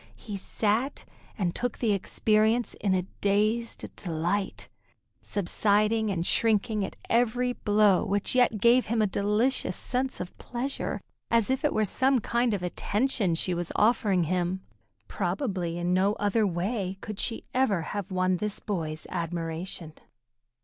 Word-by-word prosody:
He 210 Hz, -, -7 dB
sat 220 Hz, +7 st, -1 dB, 0.3 s
and 180 Hz, -5 st, 0 dB
took 245 Hz, -1 st, -2 dB
the 225 Hz, -4 st, +1 dB
experience 215 Hz, +3 st, +2 dB
in 195 Hz, -2 st, 0 dB
a 180 Hz, -, +1 dB, 0.2 s
dazed 215 Hz, +3 st, +1 dB
delight, 175 Hz, +3 st, -2 dB, 0.5 s
subsiding 210 Hz, +3 st, +1 dB
and 175 Hz, -4 st, -1 dB
shrinking 215 Hz, 0 st, +2 dB
at -, -, -5 dB
every 245 Hz, +1 st, +2 dB
blow 205 Hz, -4 st, +3 dB
which 205 Hz, 0 st, 0 dB
yet 245 Hz, -4 st, +3 dB
gave 235 Hz, +4 st, +5 dB
him 225 Hz, 0 st, +2 dB
a -, -, +4 dB
delicious 210 Hz, +6 st, +1 dB
sense 260 Hz, +1 st, -2 dB
of 180 Hz, -, -6 dB
pleasure 245 Hz, -4 st, -3 dB, 0.3 s
as 230 Hz, +1 st, +3 dB
if 265 Hz, +3 st, 0 dB
it 295 Hz, -, +3 dB
were 215 Hz, -, +1 dB
some 260 Hz, +6 st, +2 dB
kind 235 Hz, 0 st, +1 dB
of 185 Hz, -, -5 dB
attention 205 Hz, +1 st, 0 dB
she 180 Hz, +2 st, 0 dB
was 175 Hz, -1 st, -2 dB
offering 210 Hz, -4 st, +3 dB
him. 180 Hz, +2 st, -1 dB, 0.5 s
Probably 185 Hz, -3 st, -2 dB
in 175 Hz, +1 st, 0 dB
no 190 Hz, +3 st, +3 dB
other 210 Hz, +1 st, +1 dB
way 190 Hz, +2 st, -2 dB
could 215 Hz, -2 st, -6 dB
she 230 Hz, -, -2 dB
have 260 Hz, 0 st, +3 dB
ever 195 Hz, +3 st, -2 dB
won 185 Hz, -1 st, +1 dB
this 210 Hz, +2 st, -3 dB
boy's 160 Hz, -6 st, -4 dB
admiration. 165 Hz, -1 st, -4 dB
205 Hz, 145 wpm, -28 LUFS, 185-230 Hz, 0.5 s, gave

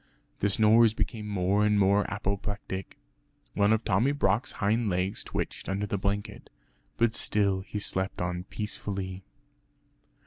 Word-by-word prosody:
The 100 Hz, -, +2 dB
snores 110 Hz, +2 st, +5 dB
became 110 Hz, -2 st, -3 dB
more 100 Hz, 0 st, +1 dB
and 105 Hz, 0 st, +3 dB
more 100 Hz, +1 st, +3 dB
apoplectic. 100 Hz, -2 st, -4 dB, 0.6 s
One 100 Hz, +1 st, +3 dB
of 110 Hz, 0 st, +2 dB
Tommy 115 Hz, +7 st, +2 dB
Brock's 125 Hz, -5 st, +1 dB
hind 110 Hz, +1 st, +1 dB
legs 90 Hz, +2 st, -1 dB
twitched -, -, -4 dB
under 100 Hz, +2 st, -1 dB
the 100 Hz, -1 st, -2 dB
blanket, 100 Hz, +1 st, -3 dB, 0.5 s
but 115 Hz, -1 st, +2 dB
still 100 Hz, -4 st, +2 dB
he 105 Hz, -, -6 dB
slept 95 Hz, -2 st, -1 dB
on 90 Hz, 0 st, -3 dB
peacefully. 95 Hz, -3 st, -5 dB
100 Hz, 135 wpm, -28 LUFS, 95-105 Hz, 0.6 s, snores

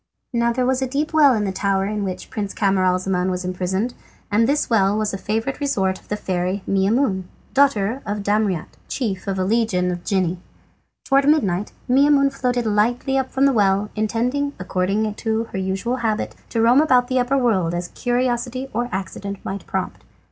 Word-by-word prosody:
Now 235 Hz, 0 st, +2 dB
there 250 Hz, +1 st, 0 dB
was 260 Hz, +1 st, +1 dB
a 265 Hz, -, 0 dB
deep 290 Hz, +5 st, -2 dB
well 290 Hz, -5 st, +6 dB
in 210 Hz, -, 0 dB
the 195 Hz, -, -1 dB
tower 195 Hz, 0 st, 0 dB
in 210 Hz, 0 st, -2 dB
which 185 Hz, -2 st, -5 dB
Prince 205 Hz, -3 st, -4 dB
Camaralzaman 185 Hz, -2 st, +1 dB
was 180 Hz, 0 st, -3 dB
imprisoned, 190 Hz, +6 st, -2 dB, 0.4 s
and 225 Hz, +4 st, +3 dB
this 290 Hz, +1 st, +1 dB
well 205 Hz, -3 st, +2 dB
was 215 Hz, -1 st, -1 dB
a -, -, -2 dB
favourite 225 Hz, +7 st, -2 dB
resort 195 Hz, -10 st, 0 dB
of -, -, -25 dB
the 210 Hz, -, -2 dB
fairy 185 Hz, 0 st, -2 dB
Maimoune, 195 Hz, 0 st, +1 dB, 0.3 s
daughter 265 Hz, -3 st, +2 dB
of 205 Hz, 0 st, -3 dB
Damriat, 205 Hz, -5 st, 0 dB
chief 200 Hz, -8 st, -3 dB
of 195 Hz, -1 st, -1 dB
a 185 Hz, -, +1 dB
legion 195 Hz, -3 st, +1 dB
of 175 Hz, -1 st, -5 dB
genii. 185 Hz, -3 st, 0 dB, 0.7 s
Towards 275 Hz, 0 st, +3 dB
midnight 210 Hz, -, +2 dB, 0.2 s
Maimoune 275 Hz, +1 st, +4 dB
floated 250 Hz, -3 st, -1 dB
lightly 235 Hz, +5 st, +1 dB
up 265 Hz, -1 st, 0 dB
from 270 Hz, +1 st, +2 dB
the 275 Hz, -, +4 dB
well, 200 Hz, -1 st, +2 dB
intending, 245 Hz, +7 st, -1 dB
according 195 Hz, +4 st, -1 dB
to 220 Hz, +1 st, -1 dB
her 190 Hz, -, -3 dB
usual 195 Hz, +6 st, -1 dB
habit, 220 Hz, -3 st, -1 dB, 0.2 s
to 225 Hz, -1 st, 0 dB
roam 245 Hz, +5 st, +6 dB
about 255 Hz, -5 st, +3 dB
the 255 Hz, 0 st, +1 dB
upper 250 Hz, +3 st, +1 dB
world 190 Hz, -10 st, +1 dB
as 175 Hz, 0 st, -3 dB
curiosity 245 Hz, +1 st, -1 dB
or 240 Hz, +2 st, -1 dB
accident 195 Hz, +1 st, -4 dB
might 195 Hz, 0 st, -5 dB
prompt. 190 Hz, -1 st, -3 dB
215 Hz, 185 wpm, -21 LUFS, 190-250 Hz, 0.7 s, well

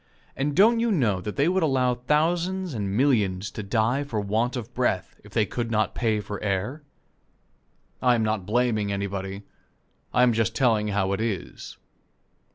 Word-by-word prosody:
And 140 Hz, +1 st, -1 dB
don't 225 Hz, +5 st, +5 dB
you 230 Hz, 0 st, +1 dB
know 115 Hz, -, +1 dB
that 105 Hz, +2 st, -5 dB
they 140 Hz, -, +2 dB
would 185 Hz, +2 st, +2 dB
allow 130 Hz, -5 st, +2 dB
thousands 170 Hz, +7 st, 0 dB
and 100 Hz, -3 st, -2 dB
millions 105 Hz, -8 st, +1 dB
to -, -, -6 dB
die 115 Hz, +6 st, +1 dB
for 120 Hz, -7 st, -3 dB
want 110 Hz, +5 st, 0 dB
of 125 Hz, 0 st, -6 dB
breath, 115 Hz, -7 st, -1 dB
if 105 Hz, -, -15 dB
they 110 Hz, 0 st, +2 dB
could 115 Hz, +3 st, -3 dB
not 110 Hz, -1 st, 0 dB
pay 110 Hz, -3 st, 0 dB
for 105 Hz, 0 st, -6 dB
air? 105 Hz, +9 st, -2 dB, 1.2 s
I 125 Hz, -1 st, +4 dB
am 115 Hz, -, 0 dB
not 110 Hz, -3 st, -1 dB
blaming 110 Hz, -3 st, +1 dB
anybody. 100 Hz, 0 st, -4 dB, 0.7 s
I 125 Hz, -, +3 dB
am 125 Hz, -2 st, +4 dB
just 110 Hz, -2 st, 0 dB
telling 110 Hz, -5 st, +2 dB
how 100 Hz, -2 st, 0 dB
it 100 Hz, -, -2 dB
is. 110 Hz, -6 st, -4 dB
115 Hz, 170 wpm, -25 LUFS, 105-135 Hz, 1.2 s, don't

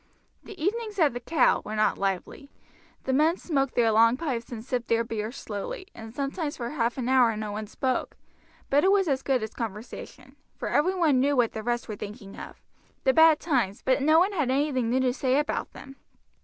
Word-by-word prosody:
The 405 Hz, -, -11 dB
evenings 425 Hz, +5 st, -2 dB
at 310 Hz, -8 st, +3 dB
the 245 Hz, -, -4 dB
"Cow" 260 Hz, +2 st, +2 dB
were 215 Hz, -, -5 dB
not 215 Hz, 0 st, +1 dB
lively. 195 Hz, +8 st, -3 dB, 0.5 s
The 265 Hz, -, -1 dB
men 315 Hz, +6 st, +3 dB
smoked 275 Hz, -5 st, -1 dB
their 230 Hz, -2 st, +3 dB
long 230 Hz, +3 st, +5 dB
pipes 255 Hz, -7 st, -4 dB
and 225 Hz, -1 st, -7 dB
sipped 245 Hz, -2 st, -2 dB
their 230 Hz, 0 st, +2 dB
beer 225 Hz, -1 st, -4 dB
slowly, 275 Hz, -, -6 dB
and 225 Hz, -1 st, -10 dB
sometimes 285 Hz, +4 st, -3 dB
for 240 Hz, -1 st, -4 dB
half 240 Hz, -5 st, -1 dB
an 250 Hz, -2 st, -2 dB
hour 250 Hz, -4 st, +4 dB
no 215 Hz, -1 st, -4 dB
one 210 Hz, +1 st, -5 dB
spoke; 255 Hz, +4 st, -2 dB, 0.5 s
but 285 Hz, +2 st, +4 dB
it 380 Hz, -, +4 dB
was 390 Hz, -2 st, +3 dB
as 270 Hz, -3 st, 0 dB
good 260 Hz, -5 st, 0 dB
as 220 Hz, -, -5 dB
conversation, 240 Hz, +4 st, -8 dB, 0.2 s
for -, -, -4 dB
every 365 Hz, +6 st, +2 dB
one 315 Hz, -8 st, +3 dB
knew 285 Hz, +2 st, +2 dB
what 240 Hz, -3 st, +2 dB
the 220 Hz, -, -5 dB
rest 240 Hz, +2 st, -2 dB
were 215 Hz, -, -5 dB
thinking 205 Hz, 0 st, -9 dB
of -, -, -10 dB, 0.4 s
the 265 Hz, -, +3 dB
bad 320 Hz, 0 st, +6 dB
times, 245 Hz, -, -1 dB
but 260 Hz, +1 st, +2 dB
no 310 Hz, +3 st, +5 dB
one 370 Hz, +5 st, +4 dB
had 305 Hz, -10 st, -1 dB
anything 260 Hz, -3 st, +1 dB
new 255 Hz, +2 st, +2 dB
to 255 Hz, -1 st, +1 dB
say 260 Hz, 0 st, +1 dB
about 295 Hz, +1 st, -1 dB
them. 270 Hz, 0 st, -12 dB
260 Hz, 210 wpm, -26 LUFS, 230-300 Hz, 0.5 s, bad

